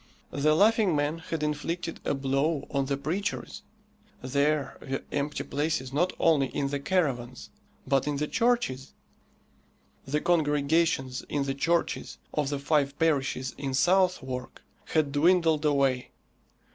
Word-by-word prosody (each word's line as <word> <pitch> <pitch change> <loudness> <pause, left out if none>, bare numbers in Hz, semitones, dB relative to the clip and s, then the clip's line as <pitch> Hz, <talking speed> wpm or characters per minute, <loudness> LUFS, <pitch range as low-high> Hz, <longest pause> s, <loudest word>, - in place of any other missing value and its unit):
The 155 +2 +2
Laughing 210 -1 +4
Man 145 +3 0
had 160 -1 -4
inflicted 165 +3 -3
a - - 0
blow 135 +3 0
on 140 -1 0
the 140 0 -1
preachers. 175 +8 -3 0.6
There 140 +1 0
were 135 0 -4
empty 145 +1 -2
places 145 -3 -2
not 175 +6 +2
only 150 -5 +3
in 140 +1 -2
the 140 0 -2
caravans, 135 -7 -1 0.3
but 135 +1 +1
in 145 - 0
the 150 +2 -1
churches. 230 - 0 1.1
The 150 +3 0
congregations 150 -4 +1
in 145 -1 0
the 135 0 -2
churches 170 +5 -1 0.2
of 145 -2 0
the 145 - -1
five 140 -1 +1
parishes 140 -5 0
in 135 -2 -2
Southwark 175 -6 +1 0.2
had 155 -3 +1
dwindled 160 0 +3
away. 135 -4 +2
145 Hz, 135 wpm, -28 LUFS, 135-165 Hz, 1.1 s, Laughing